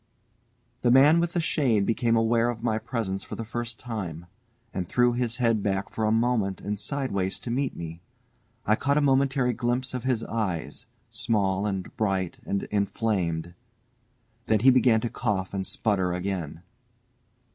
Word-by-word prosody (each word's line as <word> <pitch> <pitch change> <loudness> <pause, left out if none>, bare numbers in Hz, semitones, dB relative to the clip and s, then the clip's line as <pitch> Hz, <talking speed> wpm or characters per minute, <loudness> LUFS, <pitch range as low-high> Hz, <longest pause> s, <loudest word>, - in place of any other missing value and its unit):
The 120 - +3
man 140 +6 +7
with 170 0 0
the 175 - +1
shade 130 -11 +1
became 115 +1 +1
aware 115 +1 +3
of 115 -1 -5
my 110 -2 +1
presence 110 -6 -3
for - - -7
the 115 - -5
first 120 0 -4
time, 90 -9 -5 0.5
and 90 -2 -3
threw 120 0 +3
his 120 -1 -1
head 115 -4 +2
back 95 -1 -1
for 110 - -1
a 110 - +2
moment 115 -4 +1
and 105 0 -4
sideways, 105 -8 -1
to 120 - -4
see 135 +2 0
me. 85 0 -7 0.6
I 110 - +4
caught 140 +5 +1
a - - +4
momentary 135 -2 +2
glimpse 125 +3 -1
of 125 - -3
his 125 -4 0
eyes, 100 -8 -3 0.2
small 100 -3 0
and 95 -2 -4
bright 95 -4 -1
and 100 - -1
inflamed. 95 -5 -1 0.9
Then 110 -2 +3
he 130 +2 +7
began 120 -3 +4
to 120 - -2
cough 100 -6 -2
and 95 -1 -2
splutter 95 -4 0
again. 90 -3 -4
110 Hz, 165 wpm, -26 LUFS, 95-125 Hz, 0.9 s, man